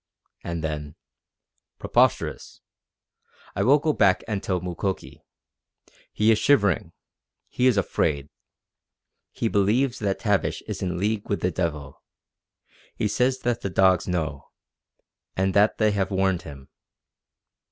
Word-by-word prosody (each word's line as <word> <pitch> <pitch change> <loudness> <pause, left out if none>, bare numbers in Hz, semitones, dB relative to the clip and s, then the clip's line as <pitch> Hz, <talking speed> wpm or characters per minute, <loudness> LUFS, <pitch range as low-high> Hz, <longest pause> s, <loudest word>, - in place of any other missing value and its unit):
And 85 -1 -4
then: 75 -1 -4 0.8
"Preposterous! - - 0 0.9
I - - -1
will 130 +8 +5
go 155 +1 0
back 95 -6 +3
and 105 -3 -2
tell 95 -3 -1
Mukoki. 90 +2 -4 0.9
He 110 +1 +3
is 110 - +3
shivering. 100 - +2 0.6
He 125 - +1
is 125 -5 +3
afraid. 75 -6 0 1.0
He 115 - -2
believes 115 +6 +1
that 100 -3 -1
Tavish 105 -3 0
is - - -6
in 90 -1 -2
league 105 +2 -2
with 100 - -1
the 90 - 0
devil. 75 -5 -4 0.9
He - - 0
says 130 +4 0
that 120 -1 -1
the 100 - -3
dogs 95 +1 +3
know, 80 -6 -3 0.9
and 95 0 +1
that 105 +2 +3
they 110 -1 +3
have 100 -2 -1
warned 95 -2 +1
him. 70 -3 -11
95 Hz, 130 wpm, -24 LUFS, 90-110 Hz, 1.0 s, will